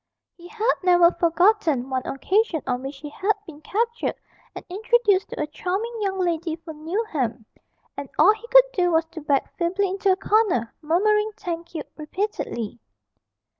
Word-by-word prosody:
He 350 0 -14
had 450 +5 +1
never 350 -2 +5
forgotten 335 - +2
one 260 -1 -2
occasion 360 - 0
on 250 -1 -1
which 270 +1 -6
he 295 +1 -8
had 400 +7 +1
been 310 -4 -12
captured 465 +7 -1 0.4
and - - -8
introduced 415 0 +2
to - - -7
a 300 - 0
charming 385 +9 -3
young 390 -2 -1
lady 340 -3 -1
from 320 -2 -11
Newnham, 310 - -2 0.5
and - - -6
all 420 - +7
he 440 +2 -12
could - - +7
do 355 -5 +2
was 325 0 +3
to 320 - -8
back 280 -2 0
feebly 370 +3 +1
into 390 +1 +1
a - - +4
corner, 385 - +1
murmuring 420 +7 +2
'Thank 340 -4 -6
you' 305 - -3
repeatedly. 300 - -4
355 Hz, 165 wpm, -24 LUFS, 305-420 Hz, 0.5 s, all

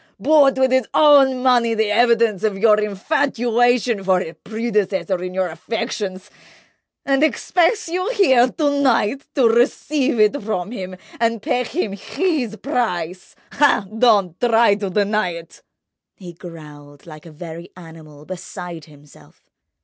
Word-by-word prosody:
—bought 280 -4 +4
with 260 -1 +2
his 260 -3 +1
own 275 -4 +5
money 240 -3 +2
the 220 -1 0
evidence 230 -3 +2
of 210 -3 -1
your 215 +1 +4
infatuation 240 0 0
for 185 -1 +2
his 165 -3 -6
predecessor 210 -4 -2
in 180 0 -5
your 185 0 -1
affections—and 215 - -5
expects 350 +6 +1
you 365 +5 -2
here 260 - +4
to 285 +1 -1
night 260 0 +1
to 260 -4 +4
receive 255 +3 0
it 215 +7 +2
from 200 -2 -4
him 185 -5 -7 0.2
and—pay 230 +1 0
him 250 - -3
his 250 - -2
price! 190 - -4 0.2
Ah, 285 -8 +2
don't 205 -7 +2
try 230 -3 +3
to 200 -1 -3
deny 205 -1 0
it!" 170 0 -12 0.5
He 180 -3 -11
growled 150 -4 -13
like 155 0 -12
a - - -12
very 165 +2 -10
animal, 160 -4 -14
beside 180 -2 -8
himself. 145 -1 -20
220 Hz, 135 wpm, -19 LUFS, 180-255 Hz, 0.5 s, own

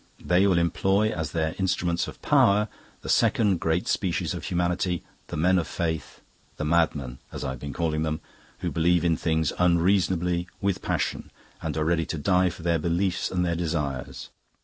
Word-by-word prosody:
They 90 +3 +4
will 95 -3 +3
employ 95 +5 +2
as 80 -6 -3
their 80 -1 -1
instruments 85 -2 0
of - - -9
power 105 +2 +4 0.3
the - - -9
second 100 -6 +3
great 80 +2 0
species 90 -4 0
of - - -6
humanity 90 0 0 0.2
the - - -5
men 90 +4 +3
of 85 - -3
Faith, 80 -4 -3 0.4
the 75 - -2
Madmen, 75 -6 +1
as - - -6
I 65 - -2
have 65 - -7
been 70 +2 -5
calling 80 +2 -1
them, 80 0 -1 0.4
who - - -1
believe 85 +1 +2
in 85 -1 +3
things 80 -2 0
unreasonably, 90 0 +2
with 100 -2 -1
passion, - - -2 0.3
and - - -3
are 75 - 0
ready 80 -1 +1
to 85 - -3
die 90 +3 +3
for 85 0 -10
their 85 -1 +2
beliefs 85 +3 0
and 90 -1 0
their 85 - 0
desires. 75 -6 -3
85 Hz, 180 wpm, -26 LUFS, 80-90 Hz, 0.4 s, They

